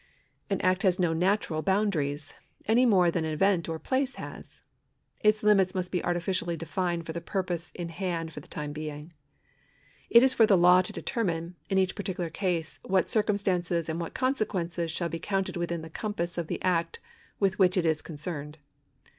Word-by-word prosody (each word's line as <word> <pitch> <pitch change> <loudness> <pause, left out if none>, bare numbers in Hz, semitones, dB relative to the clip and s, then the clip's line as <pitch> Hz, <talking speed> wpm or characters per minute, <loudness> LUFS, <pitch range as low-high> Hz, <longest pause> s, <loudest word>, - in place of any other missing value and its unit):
An 195 - 0
act 185 +1 +2
has 185 -3 +3
no 175 -3 +2
natural 180 -2 +1
boundaries, 165 -7 0 0.3
any 240 +4 +4
more 185 -6 +5
tlian - - -2
an 160 - 0
event 170 +2 +1
or 165 - -2
a - - -7
place 260 - -1
has. - - -10 0.6
Its 215 0 +3
limits 195 -3 +4
must 180 -1 -2
be 180 - -1
artificially 175 0 -1
defined 170 0 -2
for 160 - -5
the 170 - -4
purpose 175 -2 -3
in 175 -2 -4
hand 165 -2 -3
for - - -7
the - - -15
time 150 -2 -5
being. 155 +1 -7 1.0
It 235 +1 +8
is 265 - +5
for 225 - +5
the 195 - +5
law 180 +1 +7
to 185 - -6
determine, 175 -6 -2
in 195 - +1
each 190 -1 +2
particular 180 -4 -4
case, 175 -2 -2
what 190 -2 +1
circumstances 185 -6 +1
and 160 +2 -2
what 165 - -6
consequences 185 -10 -1
shall 170 +2 -1
be 165 0 -5
counted 195 +2 -2
within 170 -1 -2
the - - -7
compass 175 -4 -3
of 170 -2 -3
the - - -3
act 170 -2 0 0.4
with 195 -1 +1
which 185 -1 +4
it 175 - +2
is 160 -1 +2
concerned. 150 -1 -6
175 Hz, 190 wpm, -28 LUFS, 165-195 Hz, 1.0 s, It